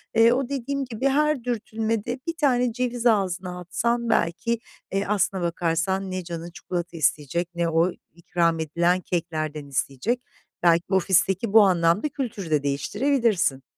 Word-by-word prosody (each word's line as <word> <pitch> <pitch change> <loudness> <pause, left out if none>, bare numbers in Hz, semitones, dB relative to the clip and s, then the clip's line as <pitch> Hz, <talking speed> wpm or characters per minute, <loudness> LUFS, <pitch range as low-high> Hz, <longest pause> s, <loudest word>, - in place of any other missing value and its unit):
eee, 230 +1 +6
o 265 0 -1
dediğim 275 0 -2
gibi 250 +2 -2
her 300 -1 +2
dürtülmede 225 0 -2
1 335 - 0
tane 250 -6 +2
ceviz 245 -1 -2
ağzına 185 -5 +1
atsan 235 +7 -1
belki, 220 +8 +1 0.3
eee, 195 +1 0
aslına 200 -2 0
bakarsan 175 +3 -1
ne 185 -1 -3
canın 170 0 -6
çikolata 175 -1 -5
isteyecek 155 +3 0
ne 170 -1 0
o 165 +3 +2 0.2
ikram 170 -1 0
edilen 170 +3 +1
keklerden 155 -4 -3
isteyecek. 140 - -2 0.4
Belki 170 +1 +3
ofisteki 195 +2 +2
bu 220 - +9
anlamda 180 - +3
kültürü 215 - -5
de 150 -2 +2
değiştirebilirsin. 185 - +1
190 Hz, 140 wpm, -24 LUFS, 170-235 Hz, 0.4 s, bu